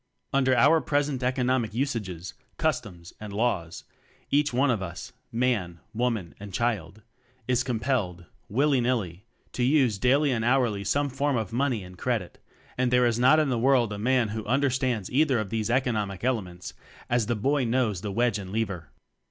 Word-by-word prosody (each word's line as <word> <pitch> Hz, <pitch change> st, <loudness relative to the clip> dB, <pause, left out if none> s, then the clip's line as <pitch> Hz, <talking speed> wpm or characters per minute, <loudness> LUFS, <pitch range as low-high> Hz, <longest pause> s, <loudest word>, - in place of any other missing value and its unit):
Under 130 Hz, -2 st, +3 dB
our 150 Hz, +6 st, +5 dB
present 145 Hz, -2 st, 0 dB
economic 125 Hz, -3 st, 0 dB
us 135 Hz, +1 st, 0 dB
ages, 95 Hz, -5 st, -6 dB, 0.2 s
customs 85 Hz, -4 st, -2 dB
and 105 Hz, -1 st, -7 dB
laws, 100 Hz, -6 st, -1 dB, 0.5 s
each 145 Hz, +1 st, +3 dB
one 130 Hz, +2 st, +2 dB
of 110 Hz, -5 st, -1 dB
us 95 Hz, +8 st, -7 dB, 0.2 s
man, 115 Hz, -8 st, 0 dB
woman 115 Hz, -6 st, -1 dB
and 100 Hz, 0 st, -8 dB
child 110 Hz, -2 st, -2 dB, 0.4 s
is 125 Hz, 0 st, +2 dB
com 125 Hz, -4 st, -2 dB
pelled, 100 Hz, -10 st, -1 dB, 0.2 s
willy 135 Hz, +3 st, +2 dB
nilly, 110 Hz, -6 st, -2 dB, 0.3 s
to -, -, -4 dB
use 125 Hz, -5 st, +3 dB
daily 140 Hz, +5 st, +3 dB
and 115 Hz, -3 st, 0 dB
hourly 120 Hz, -5 st, +2 dB
some 140 Hz, +9 st, +1 dB
form 140 Hz, 0 st, 0 dB
of 110 Hz, 0 st, -3 dB
"money" 125 Hz, -4 st, 0 dB
and 90 Hz, 0 st, -12 dB
"credit"; 115 Hz, -8 st, -2 dB, 0.4 s
and 130 Hz, -1 st, +2 dB
there 125 Hz, 0 st, +4 dB
is 120 Hz, -1 st, +1 dB
not 130 Hz, +5 st, +6 dB
in 155 Hz, -2 st, +2 dB
the 120 Hz, -3 st, 0 dB
world 120 Hz, -3 st, +3 dB
a 100 Hz, -, -5 dB
man 125 Hz, 0 st, +2 dB
who 110 Hz, +1 st, -4 dB
understands 130 Hz, -4 st, 0 dB
either 135 Hz, 0 st, +3 dB
of 110 Hz, -3 st, -3 dB
these 110 Hz, 0 st, -1 dB
economic 110 Hz, -7 st, 0 dB
elements, 95 Hz, -8 st, -2 dB, 0.3 s
as 120 Hz, -3 st, +1 dB
the 120 Hz, -, 0 dB
boy 135 Hz, +6 st, +1 dB
knows 115 Hz, -6 st, 0 dB
the 105 Hz, -, -4 dB
wedge 115 Hz, 0 st, +1 dB
and 95 Hz, -2 st, -8 dB
lever. 100 Hz, -8 st, -3 dB
120 Hz, 175 wpm, -27 LUFS, 105-130 Hz, 0.5 s, not